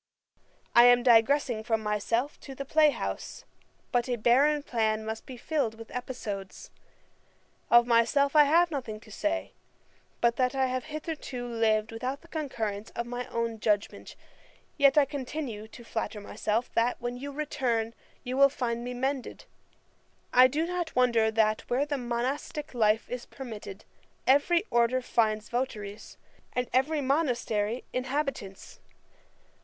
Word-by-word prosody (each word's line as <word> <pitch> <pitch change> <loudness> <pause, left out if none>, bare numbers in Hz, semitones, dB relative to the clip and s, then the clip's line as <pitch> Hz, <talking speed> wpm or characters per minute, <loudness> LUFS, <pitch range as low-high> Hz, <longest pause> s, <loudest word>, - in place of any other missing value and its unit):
I 235 0 +8
am 245 0 +6
digressing 240 -1 +4
from 225 -1 0
myself 230 +6 -1
to 270 - -10
the 275 - -5
play 305 +2 +5
house; - - -5 0.5
but 245 0 +1
a 245 - +1
barren 275 +6 +3
plan 220 -4 0
must 220 0 -5
be 255 - -8
filled 245 -5 -1
with 225 0 -11
episodes. 205 -7 -6 1.0
Of 240 0 +7
myself 245 +5 +3
I 300 -1 +8
have 335 +4 +4
nothing 235 -7 -4
to 215 0 -16
say, 315 +9 -2 0.7
but 235 0 +2
that 255 0 +1
I 265 -1 +2
have 255 -1 -2
hitherto 305 -5 -5
lived 225 -2 +1
without 255 +5 -4
the 335 - -18
concurrence 225 -10 -4
of 235 - -2
my 245 +1 -5
own 230 -1 -3
judgment; 210 -1 -1 0.6
yet 280 0 +4
I 295 - +7
continue 260 -6 -5
to 240 +2 -13
flatter 225 -2 -4
myself, 215 +3 -2
that, 235 +2 +1
when 240 0 -4
you 280 +3 -6
return, 245 -6 -1 0.3
you 255 0 -3
will 275 0 +7
find 240 -3 -3
me 250 0 -5
mended. 265 +1 -3 0.9
I 255 +1 +8
do 300 +5 -1
not 350 -1 -3
wonder 235 -3 +3
that, 215 0 +1
where 260 +4 +1
the 290 -2 -2
monastick 255 +5 -3
life 220 -2 +2
is 250 -1 -6
permitted, 215 -6 -9 0.4
every 310 +6 +4
order 240 +2 +2
finds 215 -3 0
votaries, 220 -4 -4 0.4
and 250 0 -1
every 290 +4 +2
monastery 245 -6 0
inhabitants. 255 -6 -4
245 Hz, 145 wpm, -28 LUFS, 225-275 Hz, 1.0 s, I